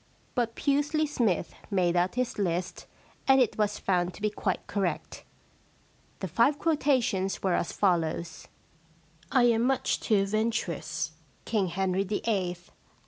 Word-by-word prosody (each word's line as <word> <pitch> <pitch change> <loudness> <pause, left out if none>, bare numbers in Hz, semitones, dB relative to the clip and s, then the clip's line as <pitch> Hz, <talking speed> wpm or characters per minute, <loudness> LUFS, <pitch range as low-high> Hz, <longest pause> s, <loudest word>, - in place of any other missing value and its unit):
But 235 -2 -1
Pusely 290 +2 +1
Smythe 225 - 0 0.2
made 180 -4 +2
out 180 +3 +1
his 250 -3 -1
list 180 -2 -2 0.4
and 270 0 +6
it 250 -5 +2
was 210 0 +1
found 180 -2 0
to - - -13
be 210 - +2
quite - - -2
correct. 195 -4 -3 1.0
The 190 - -2
five 235 - +3
quotations 260 - +1
were 190 -2 +2
as 170 - 0
follows: 170 -3 0 0.2
— 165 0 -33
* 165 +1 -30
I 255 - +4
am 230 -2 +4
much 265 +2 +1
too 205 -4 +2
venturous,' 195 -8 -1 0.3
Kirtg 200 -5 0
Henry 190 +2 0
FIIL^ 205 +1 -2
Act - - -9
I, - - +3
Scene 190 -4 +1
ii. 175 0 -9
195 Hz, 160 wpm, -28 LUFS, 175-235 Hz, 1.0 s, and